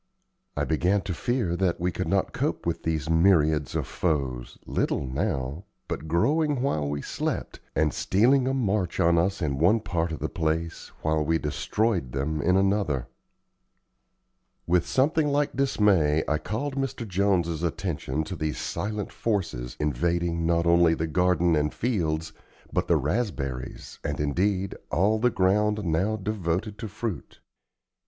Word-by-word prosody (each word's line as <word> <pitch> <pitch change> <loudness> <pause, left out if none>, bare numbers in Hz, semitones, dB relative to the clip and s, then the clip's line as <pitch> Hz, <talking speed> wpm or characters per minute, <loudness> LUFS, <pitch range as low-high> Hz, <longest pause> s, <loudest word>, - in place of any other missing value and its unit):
I - - +1
began 90 +5 +1
to 95 -2 -4
fear 110 -2 -1
that 90 -2 +1
we 90 +1 0
could - - -3
not - - +1
cope - - -2
with - - -1
these 80 -2 -1
myriads 80 -3 +3
of - - 0
foes, 70 -8 -2
little 70 - -1
now, 65 +5 -2 0.2
but 80 - -4
growing 145 - +2
while 75 - 0
we 70 0 -3
slept, - - -3 0.2
and 80 -1 +2
stealing 125 +7 +3
a 135 - +1
march 105 -7 0
on 85 0 +4
us 95 +1 0
in 70 -3 -1
one 95 +8 +4
part 85 -5 -2
of 80 - -3
the - - -2
place 80 +1 -2 0.2
while 80 0 +1
we 80 +2 +2
destroyed 85 - -1
them 75 +3 -1
in 90 +5 +3
another. 95 -10 +1 1.6
With 85 0 +2
something 150 +3 +2
like 145 -1 0
dismay 100 - +3
I 75 0 +1
called 135 +8 -3
Mr. 135 -4 -3
Jones's 90 -4 +1
attention 80 -4 -2
to 85 +4 -6
these 75 -2 -2
silent 105 -1 -3
forces, 80 - -2
invading, 85 +3 0
not 85 0 +2
only 85 -1 +5
the 80 - -1
garden 90 0 +2
and 75 0 +1
fields, 80 -9 -1 0.4
but - - 0
the - - +4
raspberries 70 - -3
and, - - -3
indeed, 95 +6 0 0.2
all 105 +5 +2
the 125 +2 +3
ground 105 +1 +2
now 90 +7 +1
devoted 100 -1 -2
to 115 - -4
fruit. 105 -4 -5
85 Hz, 150 wpm, -26 LUFS, 80-105 Hz, 1.6 s, only